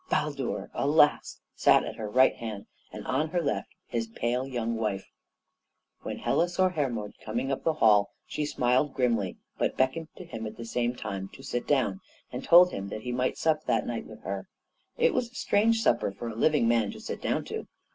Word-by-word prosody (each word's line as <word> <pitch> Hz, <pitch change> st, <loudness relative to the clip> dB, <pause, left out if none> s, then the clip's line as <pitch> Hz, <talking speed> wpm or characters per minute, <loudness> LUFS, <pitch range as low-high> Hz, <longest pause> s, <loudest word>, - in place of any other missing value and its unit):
Baldur, 145 Hz, -4 st, -1 dB
alas! 150 Hz, +1 st, +3 dB
sat -, -, +5 dB
at -, -, -6 dB
her 105 Hz, -2 st, -4 dB
right 130 Hz, +4 st, +5 dB
hand, 110 Hz, -3 st, -6 dB, 0.3 s
and -, -, -8 dB
on 150 Hz, +5 st, 0 dB
her 175 Hz, -, 0 dB
left 155 Hz, -4 st, -1 dB, 0.2 s
his 115 Hz, -1 st, -2 dB
pale 120 Hz, +3 st, -1 dB
young 115 Hz, -3 st, -2 dB
wife. 105 Hz, -4 st, -3 dB, 0.9 s
When -, -, -5 dB
Hela 175 Hz, +1 st, +1 dB
saw 185 Hz, +1 st, +2 dB
Hermod 125 Hz, -, -2 dB
coming 120 Hz, +5 st, -2 dB
up 135 Hz, -, -2 dB
the 160 Hz, -, +2 dB
hall 105 Hz, -7 st, +5 dB, 0.2 s
she 150 Hz, -, -3 dB
smiled 130 Hz, 0 st, +1 dB
grimly, 115 Hz, -7 st, +1 dB, 0.2 s
but -, -, 0 dB
beckoned 130 Hz, +5 st, +1 dB
to 185 Hz, -, -8 dB
him 115 Hz, -9 st, -6 dB
at 110 Hz, -, -9 dB
the 115 Hz, -, -6 dB
same 120 Hz, +1 st, -1 dB
time 100 Hz, -4 st, -5 dB
to -, -, -12 dB
sit 120 Hz, -, -3 dB
down, 125 Hz, -9 st, +1 dB, 0.3 s
and -, -, -5 dB
told 180 Hz, +1 st, +7 dB
him 100 Hz, 0 st, -4 dB
that 110 Hz, -, -5 dB
he 125 Hz, -, -3 dB
might 125 Hz, +1 st, 0 dB
sup 155 Hz, -1 st, +1 dB
that -, -, +1 dB
night -, -, -4 dB
with -, -, -12 dB
her. -, -, -4 dB, 0.5 s
It 485 Hz, -1 st, +3 dB
was 250 Hz, -2 st, 0 dB
a 250 Hz, -, -23 dB
strange 225 Hz, +1 st, +2 dB
supper 115 Hz, -, +2 dB
for 115 Hz, +4 st, -6 dB
a 110 Hz, -, -7 dB
living 145 Hz, 0 st, +3 dB
man 115 Hz, -3 st, +3 dB
to -, -, -10 dB
sit -, -, -6 dB
down -, -, -1 dB
to. -, -, -5 dB
125 Hz, 205 wpm, -28 LUFS, 115-155 Hz, 0.9 s, told